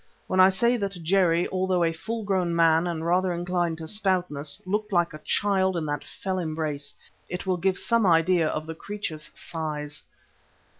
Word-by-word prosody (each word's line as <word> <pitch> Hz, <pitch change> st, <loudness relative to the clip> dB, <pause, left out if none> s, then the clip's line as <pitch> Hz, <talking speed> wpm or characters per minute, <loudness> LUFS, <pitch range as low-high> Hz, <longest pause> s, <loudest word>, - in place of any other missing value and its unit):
When 185 Hz, -, -1 dB
I 185 Hz, 0 st, +8 dB
say 235 Hz, +6 st, +2 dB
that 195 Hz, -5 st, -4 dB
Jerry, 175 Hz, -1 st, +3 dB
although 185 Hz, -1 st, +1 dB
a 165 Hz, 0 st, +1 dB
full 225 Hz, +7 st, -4 dB
grown 185 Hz, -4 st, 0 dB
man 165 Hz, 0 st, +4 dB
and 165 Hz, -2 st, -3 dB
rather 180 Hz, +2 st, +2 dB
inclined 175 Hz, -1 st, -1 dB
to 160 Hz, -1 st, -7 dB
stoutness, 180 Hz, -7 st, -1 dB
looked 210 Hz, +3 st, -2 dB
like 175 Hz, -3 st, +2 dB
a 155 Hz, -, -8 dB
child 190 Hz, -3 st, +1 dB
in 160 Hz, -, -2 dB
that 145 Hz, 0 st, -3 dB
fell 190 Hz, -1 st, -4 dB
embrace, 155 Hz, -4 st, -3 dB, 0.3 s
it 180 Hz, +2 st, -5 dB
will 185 Hz, -1 st, +1 dB
give 185 Hz, +1 st, +1 dB
some 230 Hz, -3 st, +2 dB
idea 165 Hz, 0 st, +4 dB
of 155 Hz, 0 st, -3 dB
the 160 Hz, -, -5 dB
creature's 160 Hz, -5 st, -6 dB
size. 150 Hz, -2 st, -5 dB
175 Hz, 180 wpm, -26 LUFS, 160-190 Hz, 0.3 s, I